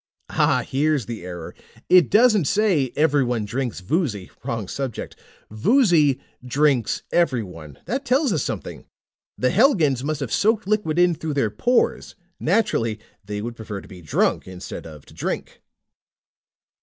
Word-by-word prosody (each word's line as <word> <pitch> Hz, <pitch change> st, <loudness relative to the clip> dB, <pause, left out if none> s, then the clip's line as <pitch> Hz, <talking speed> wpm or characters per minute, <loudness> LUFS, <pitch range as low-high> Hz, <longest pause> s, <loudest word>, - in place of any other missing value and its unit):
"Ah, -, -, +2 dB
here's 145 Hz, -2 st, +1 dB
the 115 Hz, -6 st, -6 dB
error. 90 Hz, -2 st, -7 dB, 0.3 s
It 180 Hz, -2 st, +6 dB
doesn't 215 Hz, -5 st, +5 dB
say 175 Hz, -, +2 dB
'Everyone 135 Hz, -7 st, +2 dB
drinks 120 Hz, -2 st, -3 dB
Voozy.' 105 Hz, -, -2 dB
Wrong 115 Hz, -6 st, -3 dB
subject. 130 Hz, +2 st, -5 dB, 0.4 s
'Voozy 155 Hz, -, +3 dB, 0.2 s
drinks 130 Hz, -2 st, +1 dB
everyone.' 95 Hz, -, -1 dB
That 265 Hz, +4 st, -2 dB
tells 265 Hz, -2 st, +2 dB
us 155 Hz, -, 0 dB
something! -, -, -5 dB, 0.5 s
The 125 Hz, -, +1 dB
Helgans 170 Hz, -, +3 dB
must 150 Hz, 0 st, -2 dB
have 135 Hz, -, -3 dB
soaked 220 Hz, 0 st, +2 dB
liquid 200 Hz, -6 st, 0 dB
in 175 Hz, 0 st, +4 dB
through 160 Hz, -2 st, -4 dB
their 115 Hz, -7 st, +1 dB
pores. 235 Hz, -, 0 dB, 0.2 s
Naturally, 155 Hz, -, +1 dB, 0.2 s
they 105 Hz, +1 st, -5 dB
would 120 Hz, +1 st, -5 dB
prefer 105 Hz, -3 st, -6 dB
to -, -, -14 dB
be 90 Hz, -3 st, -12 dB
drunk, 75 Hz, -, 0 dB
instead 90 Hz, -2 st, -8 dB
of 75 Hz, -3 st, -12 dB
to -, -, -17 dB
drink." -, -, -4 dB
140 Hz, 145 wpm, -23 LUFS, 110-180 Hz, 0.5 s, It